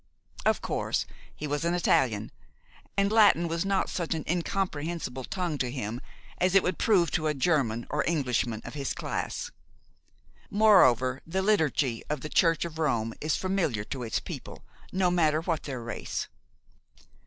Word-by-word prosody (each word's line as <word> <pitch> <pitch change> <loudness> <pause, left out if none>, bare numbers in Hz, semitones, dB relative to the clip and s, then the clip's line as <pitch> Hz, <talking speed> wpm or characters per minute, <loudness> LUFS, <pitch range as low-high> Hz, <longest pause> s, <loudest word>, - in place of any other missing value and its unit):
Of - - +2
course, - - -1 0.3
he 150 - -5
was 145 +1 -2
an 170 +1 +1
Italian, 115 -11 +2 0.7
and 200 +1 +2
Latin 205 -6 +5
was 165 0 -1
not 195 -1 +1
such 170 -2 -2
an 160 - -3
incomprehensible 165 -6 -2
tongue 175 -6 -3
to 125 - 0
him 120 -2 -4 0.4
as 185 +1 +2
it 195 - +6
would 180 - -1
prove 185 -6 +3
to 155 -2 0
a 150 - 0
German 130 -6 +1
or 150 +2 +1
Englishman 125 -8 0
of - - -7
his 140 -3 -3
class. - - -3 1.0
Moreover, 130 - +5
the 190 +3 -1
liturgy 150 - +1
of 150 -2 -2
the 150 - -5
Church 165 0 +3
of 160 -1 -7
Rome 115 -7 0
is 155 +1 +1
familiar 180 - 0
to 130 +4 -6
its 115 -2 -1
people, - - -8 0.3
no 185 -1 +2
matter 155 -3 +3
what 165 -2 -1
their 130 -4 -5
race. 120 - -4
155 Hz, 160 wpm, -28 LUFS, 130-180 Hz, 1.0 s, it